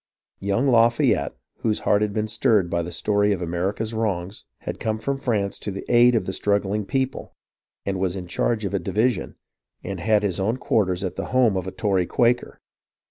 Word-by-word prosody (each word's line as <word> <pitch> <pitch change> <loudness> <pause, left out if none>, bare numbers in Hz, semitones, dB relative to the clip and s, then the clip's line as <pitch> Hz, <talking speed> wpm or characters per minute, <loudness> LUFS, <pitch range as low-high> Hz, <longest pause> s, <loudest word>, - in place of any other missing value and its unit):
Young 100 +7 0
Lafayette, 120 -2 +3 0.2
whose 110 -2 0
heart 105 - +2
had 105 -1 +1
been 110 +1 -1
stirred 110 -5 +2
by 85 - +1
the 85 +1 -5
story 105 +4 +1
of 95 - -3
America's 95 +6 -2
wrongs, 100 -3 -3 0.2
had - - -5
come 110 -1 -1
from 140 +5 -2
France 110 -8 -1
to - - -5
the 100 0 -6
aid 120 0 +6
of 110 - +1
the 95 - -3
struggling 100 +1 0
people, 135 -1 -2 0.5
and 95 -1 -2
was 95 -1 0
in 90 -2 -5
charge 105 +5 -1
of 100 - -3
a 100 - +1
division, 110 +8 0 0.5
and 95 -1 -5
had 105 +3 +2
his 95 -3 -1
own 110 +6 0
quarters 95 -7 0
at 95 - -4
the - - -3
home 125 -5 +3
of 95 -1 -2
a - - -3
Tory 95 -5 0
Quaker. 120 +1 +1
105 Hz, 195 wpm, -23 LUFS, 95-115 Hz, 0.5 s, aid